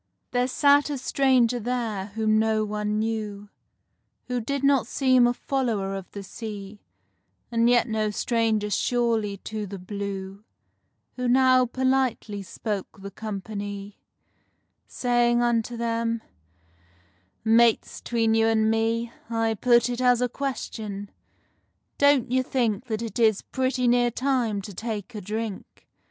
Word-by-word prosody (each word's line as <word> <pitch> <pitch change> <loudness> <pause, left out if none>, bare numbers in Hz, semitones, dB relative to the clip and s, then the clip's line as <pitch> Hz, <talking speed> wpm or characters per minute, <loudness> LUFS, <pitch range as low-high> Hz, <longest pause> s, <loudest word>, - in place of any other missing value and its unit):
There 245 0 +1
sat 285 +2 +4
a 290 - -2
stranger 255 -2 +2
there 230 -4 -2
whom 215 -1 +2
no 220 -1 +1
one 210 0 -2
knew, 215 -2 -3 0.8
Who 250 -1 -1
did 280 +4 -3
not 275 -4 +3
seem 255 -2 +4
a 240 - +1
follower 230 -9 -1
of 195 -1 -6
the 200 - -8
sea, 205 0 -8 0.7
And 230 0 +3
yet 245 0 +4
no 215 -1 0
stranger 220 -1 0
surely 225 -4 0
to 215 -1 -4
the 200 +1 -7
Blue, 195 +1 -6 0.7
Who 250 0 -1
now 255 0 +5
politely 260 -5 0
spoke 200 +1 -5
the 200 - -6
company, 205 -1 -6 0.9
Saying 240 -1 +2
unto 235 0 0
them: 230 0 -1 1.2
"Mates, 230 0 +3
'tween 225 -2 +1
you 225 0 +3
and 220 -1 +3
me, 230 +1 0 0.2
I 225 -1 +1
put 240 +2 +3
it 245 0 -3
as 250 -1 +4
a 250 - +2
question—don't 245 +2 -3
you 260 0 +3
think 245 -3 -1
That 225 -2 -3
it 230 +1 -5
is 220 -3 +3
pretty 260 -1 -1
near 245 0 +4
time 240 -5 0
to 205 - -8
take 220 +2 -5
a 210 - -6
drink? 215 +1 -6
225 Hz, 135 wpm, -25 LUFS, 210-245 Hz, 1.2 s, now